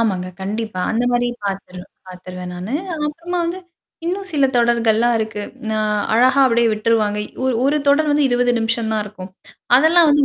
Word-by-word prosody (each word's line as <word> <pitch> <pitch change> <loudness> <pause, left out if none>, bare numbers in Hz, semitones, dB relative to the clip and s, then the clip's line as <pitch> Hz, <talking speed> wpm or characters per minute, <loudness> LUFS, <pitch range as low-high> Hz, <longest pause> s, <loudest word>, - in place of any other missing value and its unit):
ஆமாங்க. 190 -5 0
கண்டிப்பா. 215 0 -4
அந்த 230 +2 0
மாரி 245 0 +1 0.2
பார்த்துரு 195 -2 -5 0.3
பார்த்துருவேன் 180 0 -8
நானு. 180 +6 -6 0.2
அதுக்கு 300 -2 -2
அப்புறமா 340 +4 -4
வந்து, 340 +2 -3 0.5
இன்னும் 380 +2 -3
சில 280 -3 +3
தொடர்கள்லாம் 235 0 +2
இருக்கு. 220 -1 -3 0.3
நான் 215 -1 0 0.2
அழகா 255 +4 +4
அப்டியே 235 -2 +3
விட்ருவாங்க. 215 -1 +1 0.3
ஒரு 260 -1 +1
ஒரு 290 +2 +2
தொடர் 300 +2 +3
வந்து 290 -1 +3
20 245 0 +2
நிமிஷம் 225 0 -1
தான் 215 -1 0
இருக்கும். 195 -2 -10 0.5
அதெல்லாம் 320 +4 +5
வந்து 290 0 +4
230 Hz, 165 wpm, -19 LUFS, 210-280 Hz, 0.5 s, அதெல்லாம்